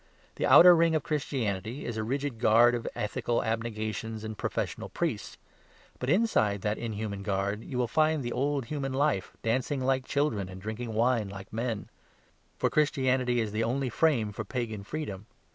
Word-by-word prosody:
The - - +1
outer 175 0 +9
ring 165 -1 +3
of 155 - 0
Christianity 125 - -2
is 120 - -3
a 110 - -2
rigid 135 +1 -2
guard 120 +1 +5
of 120 -1 -3
ethical 110 +3 -1
abnegations 110 -1 -3
and 110 0 -5
professional - - -3
priests; - - -3 0.6
but 125 - -2
inside 145 - +2
that 105 +1 -1
inhuman 105 -3 -4
guard 100 +2 -1
you 130 - -5
will 125 -1 +1
find 155 +1 +2
the 120 - -3
old 140 0 0
human 135 -1 -3
life 135 -9 0
dancing 130 +5 0
like 130 0 0
children, 125 -10 0
and 95 0 -9
drinking 110 +3 -5
wine 115 -2 +2
like 100 0 -10
men; 115 -2 -2 0.7
for - - +2
Christianity 130 -4 +2
is 110 -2 -1
the 110 +2 0
only 130 +3 0
frame 120 -6 +2
for 110 +2 -5
pagan 110 -4 -4
freedom. 105 -5 -5
120 Hz, 170 wpm, -29 LUFS, 110-135 Hz, 0.7 s, outer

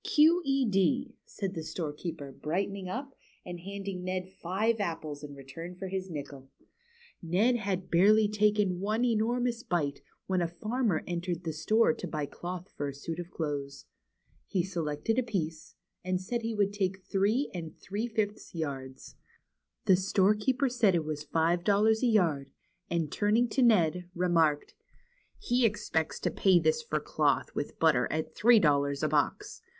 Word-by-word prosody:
" - - -47
Q. 320 +4 +5
E. 275 -2 +2
D.," 225 +7 +1
said 195 -2 -4
the 165 - -4
storekeeper, 155 -2 -5
brightening 190 +6 -3
up, 270 +6 -5 0.3
and 175 -1 -6
handing 195 0 -6
Ned 185 0 -3
five 215 +6 0
apples 160 -6 -4
in 145 -1 -8
return 165 +6 -9
for 190 +1 -6
his 190 0 -3
nickel. 140 -4 -7 0.7
Ned 200 +9 +2
had 190 -4 -3
barely 210 +5 +5
taken 210 -3 +2
one 215 +5 0
enormous 240 +1 +1
bite, 150 -9 -1 0.2
when 185 -1 0
a 170 - +1
farmer 215 +2 -1
entered 175 0 -3
the 160 -2 -3
store 220 +10 +3
to 185 - -6
buy 155 -3 -2
cloth 180 +5 -7
for 145 - -2
a 140 - -6
suit 165 +4 -5
of 175 - -5 2.0
piece, 165 -7 -3 0.4
and 185 0 0
said 235 +6 -3
he 225 0 -3
would 200 -1 +1
take 190 -2 -2
three 210 +8 +1
and 165 -3 -6
three 210 +5 -3
fifths 215 -4 -3
yards. 135 -4 -5 0.7
The 190 - +6
storekeeper 210 +8 +2
said 235 -7 +3
it 165 -2 0
was 155 -1 -3
five 165 +3 +1
dol 205 +1 +3
lars 220 0 +3
a 255 - +3
yard, 165 - +2 0.4
and 165 -4 -1
turning 220 +4 +2
to 260 - 0
Ned, 180 -7 +3
remarked: 165 -4 +2 0.6
"He 250 - +1
expects 205 -7 0
to - - 0
pay 190 -2 +4
this 470 - +2
for 470 - -2
cloth - - 0
with - - -4
butter - - +3
at - - -3
three 235 +2 +6
dollars 140 -4 +2
a - - +3
box. 150 -1 -1
185 Hz, 160 wpm, -30 LUFS, 165-215 Hz, 2.0 s, The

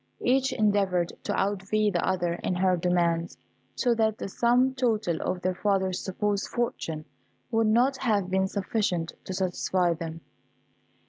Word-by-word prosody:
Each 265 +1 +2
endeavoured 195 -5 +1
to - - -1
outvie 205 +1 0
the 175 - 0
other 175 -2 0
in 185 - 0
her 185 0 +3
demands, 170 -1 0 0.4
so 245 -2 +2
that 220 -1 +1
the - - -4
sum 245 +5 +2
total 220 - 0
of 180 0 -2
their 185 0 +1
father's 190 -1 0
supposed 200 +1 -1
fortune 165 -10 -3 0.5
would 225 -1 +2
not 245 +5 +3
have 205 -8 0
been 190 0 +2
sufficient 190 -4 -1
to 190 - -4
satisfy 180 -1 +1
them. 165 0 -6
190 Hz, 145 wpm, -27 LUFS, 180-220 Hz, 0.5 s, her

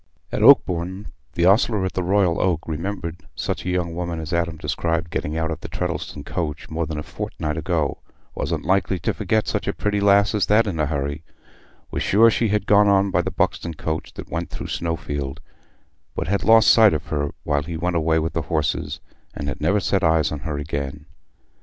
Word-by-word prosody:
At - - -2
Oakbourne, 90 +3 +4 0.2
the 85 - +1
ostler 100 0 +3
at 95 - -3
the 90 - -1
Royal 90 -1 +2
Oak 85 -4 +1
remembered 85 +1 -4 0.2
such - - -3
a 90 - -3
young 90 -2 -1
woman 85 -1 -3
as 80 +1 -5
Adam 85 -1 0
described 80 +2 -2
getting 75 +2 -2
out 80 0 -1
of 80 - -4
the - - -8
Treddleston 70 - -4
coach 80 -3 -4
more 80 0 -2
than 80 - -4
a 75 - -3
fortnight 75 0 -4
ago—wasn't 80 -3 -3
likely 95 0 +1
to 85 - -1
forget 110 +1 0
such - - -2
a - - 0
pretty 105 -1 -1
lass 100 +1 +4
as 105 - +1
that 105 +2 +4
in 90 -6 -3
a 75 - +2
hurry—was 70 +1 -7
sure 115 +3 +5
she 115 - +1
had 105 -1 +1
not - - -23
gone 105 0 +5
on 100 0 +3
by - - +2
the - - -3
Buxton 85 -1 -1
coach 80 +1 -4
that - - -9
went 85 +1 -3
through - - -7
Snowfield, 70 -5 -3 0.8
but - - -3
had 100 +2 0
lost 115 0 +7
sight 110 -7 +6
of 75 - -4
her 75 -1 0
while 70 -1 +1
he 80 +2 -5
went 90 +2 -1
away 80 0 +2
with 80 +1 -1
the 80 - 0
horses - - -1 0.3
and 70 - -5
had 70 - -4
never 105 +1 +2
set 95 0 0
eyes 80 -2 +3
on 75 - -4
her 75 0 -4
again. 70 -1 -4
85 Hz, 205 wpm, -22 LUFS, 80-100 Hz, 0.8 s, lost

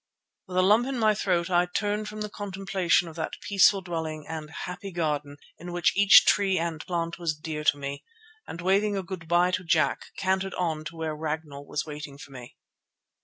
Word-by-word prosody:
With 180 - -5
a 185 - +5
lump 215 +6 +4
in 270 -1 -2
my 215 -2 +4
throat 185 -3 0
I 175 0 +3
turned 210 +3 -2
from 215 0 -7
the 210 - -3
contemplation 195 -4 0
of 160 - -10
that 160 - -4
peaceful 200 0 +4
dwelling 160 -4 -4
and 155 -1 -6
happy 180 +4 -7
garden 150 -4 -2 0.2
in 175 +1 -7
which 175 -1 +1
each 200 0 +8
tree 195 -2 +3
and 165 -1 -2
plant 170 -1 -2
was 165 -3 -1
dear 155 -1 -5
to 145 - +4
me, 140 0 -6 0.4
and 170 - -7
waving 200 +3 +2
a 190 - -2
good 185 -3 -7
bye 175 +2 +3
to 185 - -1
Jack, 160 -2 +1
cantered 190 0 0
on 160 -4 -2
to 165 - -7
where 160 -1 -3
Ragnall 150 -2 -5
was 150 - -2
waiting 150 -2 -8
for 140 - -12
me. 125 -2 -11
175 Hz, 200 wpm, -27 LUFS, 155-195 Hz, 0.4 s, each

